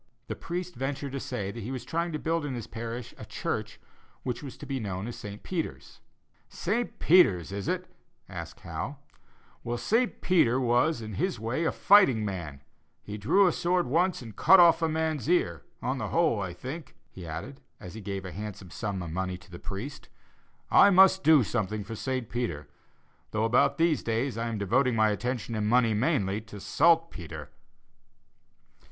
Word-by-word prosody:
The - - -5
priest 180 +1 -5
ventured 135 +1 -3
to 135 - -3
say 100 -6 -4
that 115 - -7
he 110 - -5
was 130 -2 -5
trying 170 +5 -1
to 155 - -2
build 165 +1 -1
in 140 -3 -3
his 120 - -5
parish 115 +1 -6
a - - -7
church - - -4 0.4
which 125 - -3
was 140 -3 -8
to - - -9
be 135 -1 -3
known 100 -3 -4
as 120 - -5
St. 105 0 -8
Peter's. 170 -4 -5 0.5
"St. 230 +6 -2
Peter's 100 - +4
is 100 0 -4
it?" - - -1 0.4
asked - - -8
Howe; - - -5 0.7
"well, 120 +1 -2
St. 225 - +1
Peter 130 -9 +3
was, 125 +2 +2
in 110 -1 -6
his 180 - -1
way, 120 +9 -1
a - - +2
fighting 190 - +5
man; 85 -8 -5 0.4
he 105 - -6
drew 140 - +4
a 180 - +4
sword 175 +2 +1
once 170 +3 +1
and 110 -3 -10
cut 190 - +7
off 170 -1 +7
a 165 - +2
man's 160 -3 -1
ear; 85 - +2 0.2
on 130 +1 -1
the - - -2
whole, 160 -11 +2
I 95 -2 -3
think," 130 - -8 0.2
he 90 -3 -9
added, 80 - -7 0.2
as 90 - -9
he 110 - -8
gave 100 -1 -5
a 90 - -6
handsome 100 -2 -7
sum 100 -3 -3
of 85 - -6
money 95 +1 -2
to 90 +1 -19
the 85 - -9
priest, 105 +9 -7 0.6
"I 200 - +8
must 190 0 +6
do 155 -5 +6
something 105 -1 -2
for 105 - -7
St. 130 +1 -3
Peter, 105 - -3 0.6
though 110 0 -1
about 115 +2 +3
these 165 -2 +2
days 115 +3 -1
I 115 +1 -2
am 115 -2 -3
devoting 120 +5 +2
my 110 -1 +4
attention 120 +2 -3
and 105 -1 -1
money 115 0 +4
mainly 105 - +1
to 110 -2 -11
saltpetre." 95 - +1
120 Hz, 185 wpm, -28 LUFS, 100-160 Hz, 0.7 s, I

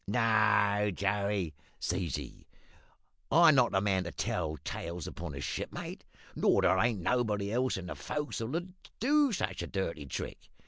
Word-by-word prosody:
"`No, 105 -2 +3
Joey,' 100 -3 0 0.3
says 90 -2 -1
he, 70 -4 -8 0.8
`I'm 165 +1 +7
not 125 -3 +4
the 95 - +2
man 95 -3 +1
to 85 - -4
tell 80 -1 -2
tales 85 -1 -5
upon 85 -4 -6
a 70 - -5
shipmate; - - -5 0.3
nor - - +3
there 95 - +4
ain't 115 -2 +2
nobody 105 -2 0
else 125 -1 +1
in 95 - -6
the 90 - -4
fo'c's'le 145 -3 -3
as'll 175 +2 -5 0.3
do 290 +3 +4
such 95 - -2
a 85 - -4
dirty 85 -6 -3
trick. - - -6
100 Hz, 155 wpm, -31 LUFS, 90-120 Hz, 0.8 s, `I'm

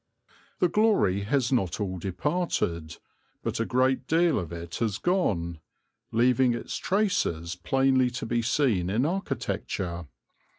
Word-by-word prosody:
The 180 - +3
glory 170 - +2
has 130 +2 +1
not 95 -10 0
all 95 -3 -3
departed, 90 - -2 0.5
but - - -2
a - - +1
great 130 +1 +1
deal 165 -3 +3
of 85 -3 -6
it 85 0 -6
has 110 -4 -1
gone, 90 - 0 0.5
leaving 125 +1 +3
its - - -5
traces 180 - 0
plainly 130 +8 +2
to 125 -1 -5
be 115 +1 0
seen 115 -7 +1
in 115 +7 +1
architecture. 95 - -3
120 Hz, 130 wpm, -27 LUFS, 90-140 Hz, 0.5 s, The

